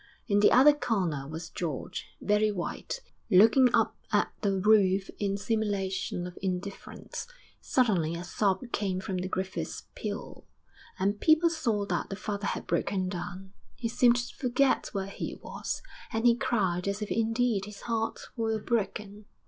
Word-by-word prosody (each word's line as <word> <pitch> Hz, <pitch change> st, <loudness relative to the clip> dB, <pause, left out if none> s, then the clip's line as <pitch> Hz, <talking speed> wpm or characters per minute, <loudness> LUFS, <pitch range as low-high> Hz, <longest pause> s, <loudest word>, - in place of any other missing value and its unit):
In 205 Hz, -3 st, +3 dB
the 205 Hz, -, +6 dB
other 280 Hz, +4 st, +8 dB
corner 180 Hz, -, -1 dB
was 160 Hz, +2 st, -7 dB
George, 160 Hz, -6 st, -4 dB
very 210 Hz, +1 st, +2 dB
white, 200 Hz, -, -4 dB, 0.3 s
looking 225 Hz, +6 st, +7 dB
up -, -, +2 dB, 0.2 s
at -, -, +2 dB
the 200 Hz, -2 st, +1 dB
roof 195 Hz, -2 st, +4 dB
in 200 Hz, -1 st, 0 dB
simulation 200 Hz, -4 st, -1 dB
of 180 Hz, 0 st, -8 dB
indifference. 190 Hz, -, -5 dB, 0.3 s
Suddenly 185 Hz, -11 st, +1 dB
a 170 Hz, -, -5 dB
sob 195 Hz, +4 st, 0 dB
came 190 Hz, -3 st, -1 dB
from 190 Hz, 0 st, -3 dB
the 180 Hz, +1 st, -2 dB
Griffiths' 190 Hz, +1 st, -3 dB
pew, -, -, -6 dB, 0.5 s
and 200 Hz, +2 st, 0 dB
people 320 Hz, +1 st, +5 dB
saw 230 Hz, -11 st, 0 dB
that -, -, -2 dB
the 195 Hz, -, -3 dB
father 205 Hz, 0 st, -3 dB
had -, -, -3 dB
broken 185 Hz, -2 st, 0 dB
down; 185 Hz, +1 st, -6 dB, 0.2 s
he 235 Hz, -, -2 dB
seemed 240 Hz, +1 st, +4 dB
to 245 Hz, 0 st, -3 dB
forget 255 Hz, +1 st, +2 dB
where 195 Hz, -2 st, -2 dB
he 195 Hz, -, -5 dB
was, -, -, -5 dB, 0.3 s
and 225 Hz, +1 st, -1 dB
he 235 Hz, -1 st, +7 dB
cried 200 Hz, -9 st, 0 dB
as 200 Hz, +2 st, -1 dB
if 210 Hz, -, -6 dB
indeed 225 Hz, -2 st, +1 dB
his 210 Hz, -1 st, -10 dB
heart 225 Hz, -1 st, -2 dB
were 225 Hz, -2 st, 0 dB
broken. 210 Hz, -2 st, -2 dB
205 Hz, 155 wpm, -29 LUFS, 190-230 Hz, 0.5 s, other